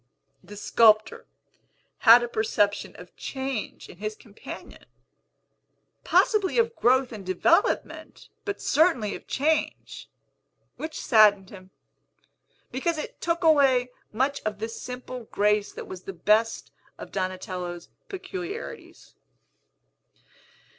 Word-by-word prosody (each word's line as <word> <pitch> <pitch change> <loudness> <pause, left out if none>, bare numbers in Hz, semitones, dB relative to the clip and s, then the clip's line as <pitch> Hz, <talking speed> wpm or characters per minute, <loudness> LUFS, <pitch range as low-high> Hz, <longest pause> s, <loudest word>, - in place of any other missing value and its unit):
The 205 - -12
sculptor 215 0 +3 0.7
had 235 0 +8
a - - -2
perception 210 -3 0
of 180 0 -14
change 265 -4 -5
in - - -14
his 215 +2 -4
companion, 210 -1 -12 1.2
possibly 420 -2 +2
of 465 0 +2
growth 255 +1 +2
and 215 -4 -8
development, 260 - 0 0.2
but 405 -1 -4
certainly 275 - +2
of - - -10
change, 305 +3 -2 0.7
which 315 0 -6
saddened 205 -4 +4
him, 185 -2 -13 1.0
because 315 +6 -1
it 305 - -7
took 340 +1 -1
away 270 -6 +4 0.2
much 265 +6 -1
of 215 -1 -3
the 220 +2 -4
simple 250 +1 -7
grace 210 0 +1
that - - -8
was 185 -1 -8
the 195 - -6
best 215 +6 +1 0.3
of - - -10
Donatello's 185 -2 -4 0.2
peculiarities. 385 +2 -8
230 Hz, 110 wpm, -26 LUFS, 205-305 Hz, 1.2 s, had